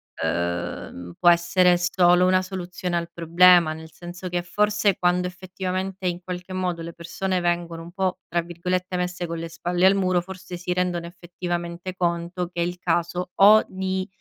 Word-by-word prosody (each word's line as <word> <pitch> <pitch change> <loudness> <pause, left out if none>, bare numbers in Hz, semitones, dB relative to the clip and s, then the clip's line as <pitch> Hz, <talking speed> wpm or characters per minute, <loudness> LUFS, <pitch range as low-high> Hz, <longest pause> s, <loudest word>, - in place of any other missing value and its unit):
ehm, 85 +1 -3
può - - +1
essere 175 +1 +4
solo 175 0 +4
una 185 0 +4
soluzione 185 -1 -4
al 170 0 -3
problema. 170 -1 +5
Nel 160 0 -11
senso 175 +2 -8
che 175 0 -1
forse 210 +1 +1
quando 180 0 +1
effettivamente, 185 +1 -4
in 175 0 -2
qualche 180 +1 -6
modo, 180 -2 -2
le 170 0 -7
persone 180 +2 -3
vengono 170 -1 -1
un 170 - -11
po' 190 0 -1
tra 170 0 +1
virgolette 180 +2 -3
"messe 180 0 -3
con 165 0 -4
le 165 0 -5
spalle 175 +2 0
al 195 +1 +6
muro," 185 -2 +2
forse 185 0 -9
si 175 +1 -4
rendono 180 -2 -1
effettivamente 175 0 -5
conto 175 0 -1
che 175 -1 -4
è - - +2
il 175 +1 -5
caso 175 +1 -1
o 210 +2 +8
di 190 0 -3
180 Hz, 175 wpm, -24 LUFS, 170-185 Hz, -, o